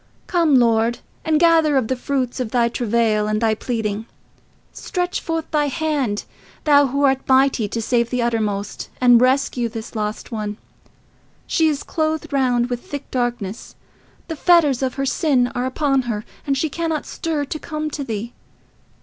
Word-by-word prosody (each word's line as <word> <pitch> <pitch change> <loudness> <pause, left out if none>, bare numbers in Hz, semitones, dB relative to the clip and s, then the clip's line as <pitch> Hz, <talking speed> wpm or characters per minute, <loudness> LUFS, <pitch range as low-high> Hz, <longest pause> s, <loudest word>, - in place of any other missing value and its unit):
Come 335 -6 +3
Lord, 230 -1 +3 0.3
and 315 -1 +2
gather 325 -3 +4
of 250 -4 +1
the 260 - 0
fruits 255 -1 -2
of 250 -3 -2
thy 235 0 +2
travail 225 -3 +1
and 215 0 0
thy 225 -1 +2
pleading. 220 -1 -3 0.7
Stretch 360 -2 -3
forth 325 -1 -3
thy 295 -1 +2
hand, 280 -7 -1 0.4
thou 285 -2 +5
who 280 +2 -1
art 270 -1 +4
mighty 260 -4 +3
to 230 - -4
save 235 0 +1
to - - -22
the 250 - +1
uttermost, 210 -3 -2
and 245 -2 +6
rescue 255 -2 +2
this 225 0 -8
lost 210 +2 -4
one. 210 -2 -4 0.9
She 325 -2 +2
is 295 -2 -1
clothed 315 -2 -2
round 250 -3 +2
with 245 0 -2
thick 285 -1 -7
darkness. 240 -4 -3 0.5
The 325 - -4
fetters 300 -5 +4
of 260 -2 -1
her 275 - -1
sin 260 -3 +1
are 250 +1 -1
upon 275 0 +1
her, 210 -2 -3 0.2
and 275 -1 +1
she 315 - +1
cannot 320 0 -2
stir 310 -3 -3
to 310 +3 -5
come 305 -1 -4
to 285 - -4
thee. 230 -1 -5
255 Hz, 170 wpm, -21 LUFS, 230-300 Hz, 0.9 s, and